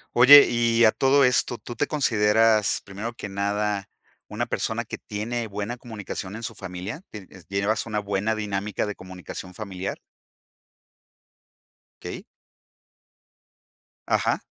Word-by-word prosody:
Oye, 140 +4 +10
y 115 -1 +3
a 110 - +6
todo 135 +3 +3
esto, 125 -1 +2
¿tú 120 - -8
te 145 - +1
consideras, 110 -6 +3
primero 105 +4 -6
que 105 -3 -7
nada, 100 0 -1 0.4
una - - -3
persona - - -1
que - - -7
tiene 115 +3 -4
buena 105 +3 -5
comunicación 105 -4 -7
en 115 - -7
su 115 - -5
familia? 95 - -6
Tienes 95 -4 -12
¿llevas 100 +2 0
una 105 -2 -2
buena 105 +1 -1
dinámica 105 -1 -2
de 105 - -4
comunicación 90 0 -9
familiar? 95 -1 -5 2.0
Okey. - - -7 1.8
Ajá. - - +1
105 Hz, 125 wpm, -25 LUFS, 100-115 Hz, 2.0 s, Oye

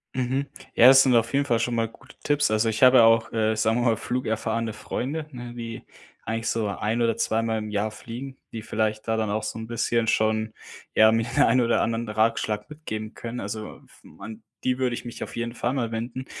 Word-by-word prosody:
Mhm. 130 +2 -1 0.3
Ja, 120 - +8
das 135 0 +9
sind 130 - +3
auf 115 +1 +2
jeden 140 +1 +3
Fall 120 -5 +1
schon 120 +2 -1
mal 115 -1 0
gute 130 +3 -18
Tipps. 145 0 +2
Also, 110 +1 +2
ich 110 +2 0
habe 130 0 +8
ja 115 - +8
auch, 115 0 +4
äh, 110 -1 +1
sagen 110 +2 +1
wir - - 0
mal, 115 -2 +2
flugerfahrende 115 -2 -2
Freunde, 140 +8 -4
ne? 120 -2 -8
Die 115 -1 -7 0.4
eigentlich 115 +1 -3
so 115 -2 0
1 110 +4 -1
oder 115 -1 +1
2 110 +1 +1
mal 115 -1 -1
im 110 0 -4
Jahr 105 +1 -1
fliegen, 125 +5 -8 0.2
die 115 - -5
vielleicht 110 0 -2
da 110 - +1
dann 110 -1 -1
auch 110 +1 -1
so 110 +1 -4
'n 110 - -7
bisschen 115 0 0
schon, 110 0 +1 0.4
ja, 110 0 +7
mir 115 0 +1
den 145 - +5
ein 130 - +4
oder 120 -1 +2
anderen 115 +1 -1
Ratschlag 105 -1 0
mitgeben 110 -8 -6
können. 120 +1 -6
Also 105 +2 -6
f - - -22
man 110 +3 -11 0.2
die 130 0 0
würde 125 -2 0
ich 120 - -8
mich 120 - -6
auf - - -8
jeden 115 0 -3
Fall 120 +1 -2
mal 120 -4 -2
wenden. 120 +3 -4
115 Hz, 230 wpm, -25 LUFS, 110-120 Hz, 0.4 s, das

